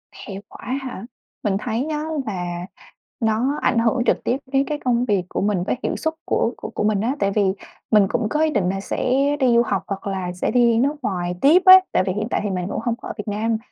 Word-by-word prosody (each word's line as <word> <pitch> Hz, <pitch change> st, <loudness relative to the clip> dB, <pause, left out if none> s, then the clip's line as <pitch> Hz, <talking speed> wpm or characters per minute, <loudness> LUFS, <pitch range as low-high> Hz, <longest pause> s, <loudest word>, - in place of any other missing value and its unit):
Hệ 195 Hz, -, -9 dB, 0.2 s
quả -, -, -12 dB, 0.2 s
hả? 250 Hz, -6 st, -7 dB, 0.4 s
Mình 200 Hz, -2 st, +1 dB
thấy 235 Hz, +3 st, -2 dB
á 300 Hz, 0 st, -2 dB, 0.2 s
là 180 Hz, -3 st, -4 dB, 0.5 s
nó 235 Hz, +5 st, +1 dB
ảnh 235 Hz, -, +2 dB
hưởng 235 Hz, +2 st, +2 dB
trực -, -, +1 dB
tiếp 250 Hz, -, 0 dB
đến 270 Hz, 0 st, +3 dB
cái 300 Hz, -, -2 dB
công 245 Hz, -1 st, +2 dB
việc 200 Hz, -6 st, +1 dB
của -, -, -2 dB
mình 200 Hz, -3 st, +1 dB
với 190 Hz, -, -1 dB
hiệu -, -, -1 dB
suất 320 Hz, 0 st, -2 dB
của -, -, 0 dB
của -, -, -7 dB
của -, -, -3 dB
mình 210 Hz, -2 st, +1 dB
á. 245 Hz, +5 st, 0 dB
Tại 200 Hz, -, +1 dB
vì 205 Hz, +1 st, +2 dB, 0.5 s
mình 210 Hz, -3 st, +5 dB
cũng 225 Hz, -1 st, -1 dB
có 300 Hz, +5 st, +1 dB
ý 315 Hz, -, +3 dB
định 205 Hz, -11 st, 0 dB
là 195 Hz, +1 st, -2 dB
sẽ 250 Hz, +5 st, -1 dB, 0.3 s
đi 260 Hz, -, +3 dB
du 235 Hz, -, +6 dB
học 200 Hz, -3 st, -1 dB
hoặc 195 Hz, 0 st, -5 dB
là 190 Hz, -2 st, -3 dB
sẽ 180 Hz, -, -2 dB
đi 235 Hz, -2 st, +4 dB
nước 280 Hz, +5 st, +2 dB
ngoài 180 Hz, -4 st, -2 dB
tiếp 320 Hz, +7 st, +6 dB
á. 375 Hz, 0 st, +11 dB
Tại -, -, +2 dB
vì 185 Hz, -, +1 dB
hiện 210 Hz, +3 st, -2 dB
tại -, -, 0 dB
thì 205 Hz, -, -1 dB
mình 180 Hz, -2 st, -2 dB
cũng -, -, -3 dB
hông 235 Hz, -1 st, 0 dB
có 240 Hz, -, -10 dB
ở -, -, -4 dB
Việt 210 Hz, -, -6 dB
Nam, 220 Hz, +2 st, 0 dB
220 Hz, 255 wpm, -22 LUFS, 195-250 Hz, 0.5 s, á